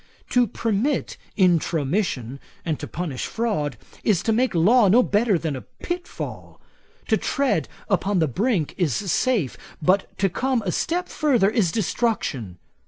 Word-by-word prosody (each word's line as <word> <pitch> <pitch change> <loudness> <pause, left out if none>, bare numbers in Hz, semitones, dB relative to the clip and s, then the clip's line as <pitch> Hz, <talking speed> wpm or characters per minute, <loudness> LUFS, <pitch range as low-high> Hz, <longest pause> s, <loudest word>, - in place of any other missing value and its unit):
To 245 -1 +4
permit 230 +7 -1 0.2
Intromission, 160 - +1 0.3
and 160 -3 -1
to - - -5
punish 155 -6 -4
fraud, 210 -12 -1 0.3
is 200 -4 +2
to 225 - +1
make 245 -2 +1
law 210 +7 +5
no 235 +7 +6
better 210 -2 +2
than 160 -3 -3
a 130 - -6
pitfall. 350 0 -7 0.5
To - - +4
tread 280 -2 0 0.2
upon 200 -1 +1
the 160 -3 +3
brink 190 - 0
is 155 -10 +1
safe; 200 - 0 0.2
but 185 +4 +1
to 195 - +2
come 245 +5 0
a 180 - 0
step 350 - -1
further 245 -10 +2
is 205 -8 +2
destruction. 160 - -1
200 Hz, 145 wpm, -23 LUFS, 160-235 Hz, 0.5 s, no